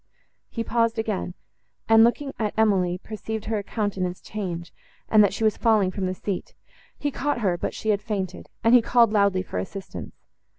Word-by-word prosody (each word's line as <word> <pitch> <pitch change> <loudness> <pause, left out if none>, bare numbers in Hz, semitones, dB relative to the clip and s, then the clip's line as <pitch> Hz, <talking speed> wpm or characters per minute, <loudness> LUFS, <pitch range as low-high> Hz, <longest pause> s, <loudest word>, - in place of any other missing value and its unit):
He 230 - -3
paused 230 0 +1
again; 215 -5 -2 0.5
and, 225 0 +7
looking 275 +4 +1
at 215 -2 -1
Emily, 190 -5 +2
perceived 220 +2 -6
her 215 -1 -1
countenance 195 -4 -2
change, 175 -5 -5 0.3
and 215 -1 +6
that 200 - +3
she 200 - -4
was 215 -2 +2
falling 215 -5 +3
from 190 -1 -2
the 185 - -2
seat; 190 -1 -5 0.4
he 290 - -2
caught 275 -2 -1
her, 190 -5 +2
but 175 - -4
she 220 - -3
had 205 -1 +2
fainted, 195 -4 -4
and 230 - +5
he 250 - +8
called 235 -1 +4
loudly 200 -3 +3
for 95 - -4
assistance. 95 - -7
210 Hz, 180 wpm, -25 LUFS, 185-225 Hz, 0.5 s, he